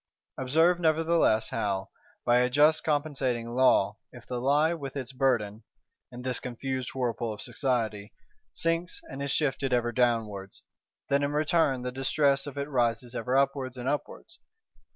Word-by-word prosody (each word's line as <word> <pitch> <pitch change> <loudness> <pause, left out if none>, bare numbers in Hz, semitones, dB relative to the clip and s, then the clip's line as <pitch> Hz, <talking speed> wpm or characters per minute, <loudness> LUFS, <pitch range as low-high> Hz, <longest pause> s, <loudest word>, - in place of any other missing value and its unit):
Observe 160 +7 +3
nevertheless 160 -8 +2
how, 100 -4 -2 0.3
by 120 0 +4
a 125 0 +2
just 150 +4 +4
compensating 135 -6 -1
law, 130 +1 +3
if - - -13
the 125 -1 -4
lie 145 +5 +3
with 140 -5 -6
its 135 -2 -4
burden 120 -6 0 0.5
(in 125 0 -9
this 125 -1 -1
confused 130 +1 -4
whirlpool 120 -3 -1
of 105 - -7
Society) 110 -6 -2 0.4
sinks 165 +1 -1
and 135 - -6
is 140 - -2
shifted 135 -2 0
ever 120 -1 +1
downwards, 115 -6 -1 0.5
then 140 0 +3
in 145 +1 -1
return 150 -4 +2
the 125 - -3
distress 140 +2 +1
of 145 - -8
it 140 0 -2
rises 120 -3 0
ever 125 +1 0
upwards 135 -2 0
and 125 +1 -5
upwards. 150 - -4
130 Hz, 150 wpm, -28 LUFS, 120-145 Hz, 0.5 s, by